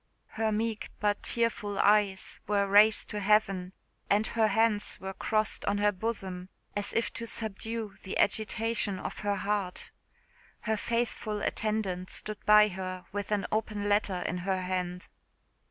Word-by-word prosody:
Her 220 0 -1
meek 220 0 -2
but 205 -1 +1
tearful 220 -3 -1
eyes 200 -2 +2
were 200 -1 +2
raised 210 +2 +5
to 210 - -3
heaven, 195 -3 +2 0.4
and 210 +2 +3
her 220 -1 +2
hands 215 0 +1
were 190 0 -5
crossed 215 +2 0
on 200 - +1
her 205 0 +3
bosom, 190 -3 -4 0.3
as 205 0 0
if 230 - 0
to 230 - -5
subdue 220 0 -4
the 190 - -4
agitation 220 -1 +1
of - - -6
her 205 -1 0
heart. 200 -2 -2 0.7
Her 220 0 0
faithful 220 -2 -2
attendant 200 -4 -1
stood 215 0 -3
by 210 0 +8
her 185 -1 -5
with 205 0 -4
an 205 -1 +1
open 210 -1 -1
letter 205 -3 +1
in 180 - -2
her 185 0 -1
hand. 180 0 -3
205 Hz, 150 wpm, -30 LUFS, 190-215 Hz, 0.7 s, by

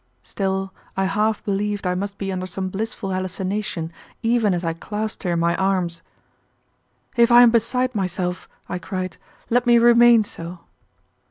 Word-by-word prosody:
Still, 190 -1 -2 0.2
I 195 - +2
half 210 +2 0
believed 205 0 -1
I 180 - +1
must 200 +2 -4
be 195 -1 -3
under 185 0 -3
some 190 0 -4
blissful 200 0 -4
hallucination 185 -2 -3 0.3
even 225 -2 +2
as 175 0 -3
I 165 - 0
clasped 210 +5 -5
her 175 -3 -1
in 170 - 0
my 170 0 +2
arms. 185 -3 0 1.1
"If 235 0 +4
I 240 +1 +9
am 240 - +6
beside 250 +3 +1
myself," 180 -3 -2 0.2
I 180 - -4
cried, 185 +1 -5 0.3
"let 245 +1 +2
me 240 0 +6
remain 235 -1 +6
so." 170 -3 -8
195 Hz, 160 wpm, -22 LUFS, 185-220 Hz, 1.1 s, I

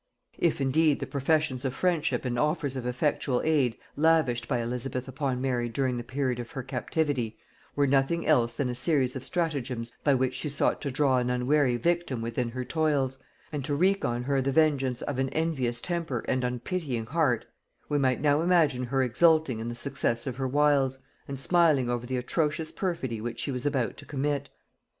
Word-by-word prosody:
If 170 -4 +2
indeed 145 +2 +3
the - - -3
professions 140 -2 0
of 130 -2 -2
friendship 170 -6 0
and 120 -1 -1
offers 150 -2 0
of 125 -2 -3
effectual 125 0 0
aid 140 -7 +2 0.2
lavished 145 -7 +2
by 125 - 0
Elizabeth 125 +2 -3
upon 130 -1 -2
Mary 125 -2 0
during 125 +1 -1
the 120 - -4
period 130 0 -2
of 120 -1 -6
her 135 - -4
captivity, 130 -2 -1 0.4
were 145 - +3
nothing 140 +5 +2
else 120 -6 +3
than 135 +1 -1
a 125 - -2
series 130 -1 +1
of 130 - -5
stratagems 130 -9 -2
by 140 -2 +4
which 130 0 +1
she 140 +4 -3
sought 140 - 0
to 140 - -2
draw 135 -1 +2
an 125 0 -1
unwary 125 +1 +2
victim 170 -4 0
within 115 +1 -2
her 125 +2 -4
toils, 140 -3 0 0.3
and 145 -3 -3
to 145 +2 -1
wreak 190 +6 +2
on 120 0 -1
her 135 +1 +1
the 135 +1 0
vengeance 135 -4 +2
of 140 -3 -3
an 135 0 +1
envious 135 -7 -1
temper 165 -7 -3
and 130 0 0
unpitying 125 0 -2
heart, 140 -4 +1 0.4
we 145 - +1
might 130 -2 +2
now 145 +1 +3
imagine 165 -8 +3
her 135 +2 +1
exulting 155 0 +3
in 115 - -4
the 120 - -4
success 120 -2 -1
of 130 -3 -4
her 135 -1 -1
wiles, 140 -1 +2 0.3
and 135 -1 -5
smiling 150 -5 +3
over 120 0 -3
the 130 0 -1
atrocious 155 +4 -1
perfidy 130 - -3
which 115 0 -5
she 125 - -2
was 125 +1 -2
about 130 -6 -1
to - - -10
commit. 145 0 -2
135 Hz, 190 wpm, -28 LUFS, 125-150 Hz, 0.4 s, by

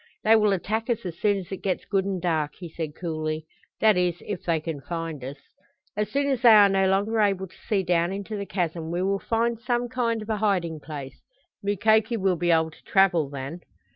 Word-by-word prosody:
"They 220 +1 +6
will 210 -2 +4
attack 220 +5 -1
us 230 -4 -1
as 170 -2 -6
soon 205 -1 +2
as 190 -1 -8
it 195 - -3
gets 190 -2 -2
good 195 -2 0
and 195 -2 -2
dark," 160 -4 -1
he 175 - -8
said 160 -1 -5
coolly. 155 -2 -3 0.4
"That 215 -3 +5
is, 180 -1 0
if 205 -4 -5
they 165 -2 +1
can 155 -2 -5
find 165 -3 -5
us. 135 +3 -6 0.6
As 210 0 -1
soon 280 0 0
as 260 -3 -1
they 240 - +7
are 210 -2 +8
no 195 0 +2
longer 205 +4 +1
able 195 -2 +1
to 185 - -18
see 200 -3 +2
down 175 0 +1
into 200 +2 -5
the 200 -1 -4
chasm 165 -3 -2
we 175 +2 -1
will 195 +1 +1
find 230 +1 0
some 240 +1 -1
kind 230 -3 -1
of 215 - -12
a 215 - 0
hiding 180 -6 0
place. 145 -3 -8 0.4
Mukoki 220 +3 +2
will 190 -3 +1
be 175 +1 -1
able 160 -1 +3
to - - -19
travel 175 -7 +3
then." 140 +4 -6
190 Hz, 225 wpm, -25 LUFS, 165-215 Hz, 0.6 s, are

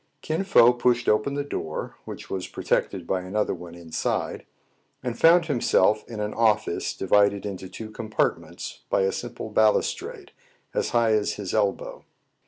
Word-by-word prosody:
• - - -47
Kin 160 +4 -1
Fo 125 -10 +6
pushed 120 0 +1
open 105 +7 +2
the 145 - -1
door, 80 - -5
which - - -8
was 95 -1 -4
pro - - -8
tected 95 -4 0
by 95 +1 -1
another 100 +4 -1
one 85 -1 -9
inside, 85 -2 -3 0.6
and 125 -2 -2
found 170 +1 +6
himself 110 - +2
in 115 -2 -6
an 105 0 -2
office 110 -5 +1
divided 100 +1 +2
into 95 -2 -6
two 110 +2 -8
compartments 110 0 -3
by - - +2
a 95 0 +2
simple 120 -2 -6
balustrade, 110 0 +1 0.4
as - - 0
high 115 -2 +2
as 105 -1 +1
his 100 -3 -5
elbow. 105 -2 -1
105 Hz, 165 wpm, -25 LUFS, 95-120 Hz, 0.6 s, Fo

